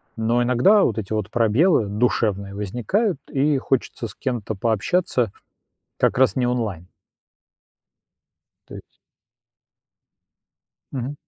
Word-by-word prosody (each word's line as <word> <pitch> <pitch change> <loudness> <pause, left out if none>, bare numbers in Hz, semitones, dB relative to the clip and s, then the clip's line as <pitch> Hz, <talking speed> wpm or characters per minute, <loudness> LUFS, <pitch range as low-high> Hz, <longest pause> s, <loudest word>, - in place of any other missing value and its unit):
но 115 +2 +1
иногда 125 - +4
вот 110 - 0
эти 105 -2 -5
вот 105 -2 -2
пробелы 115 - +3
душевные 100 -2 -1
возникают 125 - -1
и 145 +1 +1
хочется 130 -3 -2
с - - -10
кем-то 120 -5 -3
пообщаться, 115 - 0 0.7
как - - +1
раз 130 0 +3
не 130 -2 +1
онлайн. 110 -9 -2 1.8
То - - -11
есть - - -13 2.0
Мгм. 135 +1 -4
120 Hz, 105 wpm, -22 LUFS, 105-135 Hz, 2.0 s, иногда